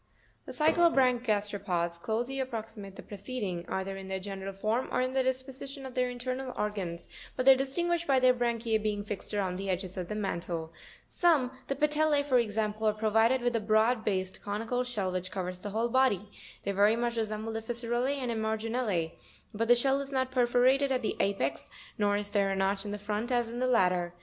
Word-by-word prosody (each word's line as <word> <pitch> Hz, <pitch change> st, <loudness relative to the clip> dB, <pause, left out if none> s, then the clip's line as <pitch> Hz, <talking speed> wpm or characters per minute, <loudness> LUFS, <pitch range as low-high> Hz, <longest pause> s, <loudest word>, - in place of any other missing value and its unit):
32. -, -, -5 dB
The 305 Hz, -, 0 dB, 0.3 s
cyclobranch 250 Hz, -3 st, +3 dB
gasteropods 195 Hz, -5 st, 0 dB
closely 240 Hz, +6 st, -2 dB
approximate 220 Hz, -6 st, -5 dB
the -, -, -9 dB
pre 205 Hz, -, -9 dB
ceding, 195 Hz, -5 st, -4 dB
either 190 Hz, 0 st, -2 dB
in 190 Hz, 0 st, -8 dB
their 190 Hz, 0 st, -3 dB
general 195 Hz, 0 st, -5 dB
form, 215 Hz, +6 st, -1 dB
or -, -, +1 dB
in 255 Hz, +1 st, 0 dB
the 265 Hz, -, +3 dB
disposition 265 Hz, +2 st, -4 dB
of 260 Hz, -, -7 dB
their 250 Hz, 0 st, +1 dB
internal 255 Hz, +1 st, -4 dB
organs; 190 Hz, -5 st, -3 dB, 0.3 s
but 255 Hz, -, -1 dB
they 270 Hz, -, +10 dB
are -, -, +1 dB
distinguished 340 Hz, +6 st, 0 dB
by 270 Hz, -2 st, +4 dB
their 255 Hz, 0 st, +5 dB
branchise 235 Hz, -2 st, 0 dB
being 210 Hz, -1 st, -1 dB
fixed 205 Hz, -1 st, -6 dB
around 190 Hz, -3 st, -1 dB
the 195 Hz, +1 st, -4 dB
edges 185 Hz, 0 st, -3 dB
of 180 Hz, -2 st, -3 dB
the 210 Hz, -, -4 dB
mantle 170 Hz, -5 st, -3 dB
( -, -, -20 dB
fig. -, -, -27 dB
78). 320 Hz, -8 st, +3 dB
38. -, -, -18 dB
Some, 260 Hz, -, -18 dB
the 275 Hz, -, -1 dB
Patelle 300 Hz, +2 st, +2 dB
(fig. 285 Hz, -1 st, +3 dB
78), -, -, -12 dB
for 255 Hz, -, +5 dB
example, 215 Hz, -1 st, -1 dB
are 215 Hz, -, +3 dB
provided 225 Hz, +4 st, +3 dB
with 245 Hz, -1 st, +1 dB
a -, -, +3 dB
broad 220 Hz, +2 st, +2 dB
based, 190 Hz, -2 st, -2 dB
eonical 225 Hz, +5 st, -2 dB
shell, 215 Hz, -7 st, -2 dB
which 185 Hz, 0 st, -3 dB
covers 180 Hz, -2 st, -4 dB
the 205 Hz, -, -4 dB
whole 225 Hz, +3 st, 0 dB
body; 225 Hz, -6 st, +2 dB, 0.3 s
they 200 Hz, -, -1 dB
very 205 Hz, +3 st, +4 dB
much 235 Hz, 0 st, -1 dB
resemble 220 Hz, 0 st, -2 dB
the 225 Hz, -, -3 dB
Fissurel 235 Hz, +1 st, -2 dB
lz 280 Hz, +2 st, 0 dB
and 250 Hz, -3 st, -2 dB
Emarginule, 220 Hz, -5 st, -1 dB, 0.4 s
but 225 Hz, +2 st, -1 dB
the 245 Hz, -, +7 dB
shell 270 Hz, +3 st, +2 dB
is 275 Hz, 0 st, -6 dB
not 260 Hz, -1 st, 0 dB
perforated 255 Hz, +2 st, +3 dB
at 255 Hz, -2 st, 0 dB
the -, -, -1 dB
apex, 140 Hz, -9 st, 0 dB, 0.3 s
nor 205 Hz, -1 st, +3 dB
is 205 Hz, 0 st, -1 dB
there 200 Hz, -1 st, +2 dB
a 195 Hz, -, 0 dB
notch 195 Hz, +1 st, 0 dB
in 205 Hz, 0 st, -3 dB
front 210 Hz, +4 st, -3 dB
as 240 Hz, -2 st, +1 dB
in 240 Hz, -, -5 dB
the 255 Hz, -, +1 dB
latter. 180 Hz, -7 st, +2 dB
220 Hz, 225 wpm, -30 LUFS, 200-255 Hz, 0.4 s, they